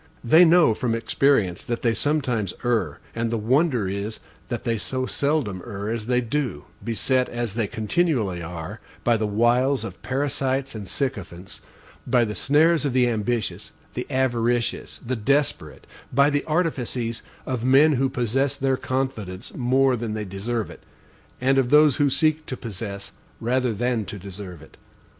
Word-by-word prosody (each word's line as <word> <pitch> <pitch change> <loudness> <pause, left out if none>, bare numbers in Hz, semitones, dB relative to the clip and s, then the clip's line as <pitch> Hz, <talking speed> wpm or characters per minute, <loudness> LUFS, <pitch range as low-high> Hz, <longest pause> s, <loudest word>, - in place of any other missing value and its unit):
They 160 +9 +7
know 165 -7 +5
from 115 +1 -1
experience 115 -6 +1
that 120 -1 -4
they 115 -2 +3
sometimes 125 - 0
err; 105 -12 0 0.2
and 115 0 -1
the 115 - -1
wonder 125 - +2
is 100 +3 -4 0.3
that 120 -2 -3
they 115 -2 0
so 130 +4 -2
seldom 140 - -1
err 105 -1 -5
as 115 -1 -4
they 125 0 +2
do, 120 - -2 0.2
beset, 125 +3 +1
as 120 -3 -3
they 115 -2 -1
continually 110 - 0
are, 80 -1 -6 0.2
by 120 - +3
the 110 -1 0
wiles 120 +4 +2
of 95 -5 -8
parasites 135 0 -1
and 105 -3 -7
sycophants, 95 -8 -5 0.5
by 120 -2 +3
the 105 - -4
snares 155 +6 +3
of 140 -4 0
the 125 -1 +4
ambitious, 115 -1 -2 0.2
the - - -4
avaricious, 120 -2 0
the 130 +2 -1
desperate, 140 +6 -1 0.3
by 140 +3 +4
the 145 0 0
artifices 130 -8 -1 0.2
of 125 -3 -3
men 135 +5 +6
who 135 -1 +1
possess 130 +3 0
their 135 -1 0
confidence 115 -10 -3
more 130 +1 +2
than 115 -2 -3
they 105 -1 -3
deserve 105 +3 -3
it, - - -13 0.6
and 135 +2 +3
of 125 -2 +1
those 150 -1 +6
who 145 -1 +3
seek 155 +3 +1
to 130 - -4
possess 100 -2 -6 0.3
rather 125 +1 +1
than 115 0 -1
to 100 - -7
deserve 95 -3 -9
it. - - -18
120 Hz, 160 wpm, -24 LUFS, 110-135 Hz, 0.6 s, They